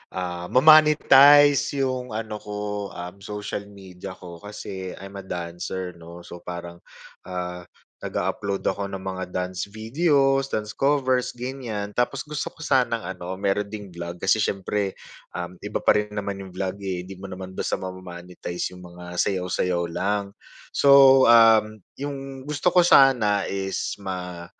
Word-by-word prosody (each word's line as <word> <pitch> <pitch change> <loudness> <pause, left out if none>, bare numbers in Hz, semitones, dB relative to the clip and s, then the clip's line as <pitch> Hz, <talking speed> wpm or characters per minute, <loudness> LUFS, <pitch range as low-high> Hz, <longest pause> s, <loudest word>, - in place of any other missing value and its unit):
ah, 90 -1 -4
ma-monetize 145 -1 +6
yung 125 -4 -3
ano 110 -1 -4
ko, 105 -1 -4
um, 90 +2 -8
social 105 0 -6
media 95 -1 -10
ko. 85 -2 -11
Kasi 95 -2 -7
I'm 100 0 -9
a 95 - -11
dancer 90 +1 -5
'no. 85 +1 -11
So 85 0 -10
parang, 85 0 -8 0.5
ah, 90 -1 -5 0.4
nag-a-upload 100 -1 -2
ako 100 +1 -1
ng 95 - -5
mga 95 -1 -4
dance 90 0 -3
videos, 135 +5 +1
dance 105 -1 -3
covers, 130 -3 +1
ganyan. 120 -5 -5
Tapos 125 +2 0
gusto 150 0 -5
ko 165 - -15
sanang 125 -5 +1
ano, 90 -1 -6
meron 100 +2 0
ding 100 -1 -8
vlog, 85 0 -7
kasi 95 +3 +3
syempre, 100 -1 -1 0.4
um, 90 0 -6
iba 105 +3 -4
pa - - +4
rin 105 0 -3
naman 100 -1 -3
yung 95 -2 -9
vlog, 95 +1 -3
eh. 90 -2 -2
Hindi 95 +1 -10
mo 95 - -9
naman 95 -1 -8
basta - - -2
ma-mo-monetize 90 -1 -6
yung 90 - -12
mga 90 0 -9
sayaw-sayaw 90 -2 0
lang. 100 +3 -1 0.4
So, 135 -1 +7
um, 110 -2 +6 0.2
yung 135 -1 -6
gusto 150 +4 +1
ko 180 0 +4
sana 115 - +5
is 95 0 -3
ma 90 -3 -6
100 Hz, 150 wpm, -24 LUFS, 90-125 Hz, 0.5 s, So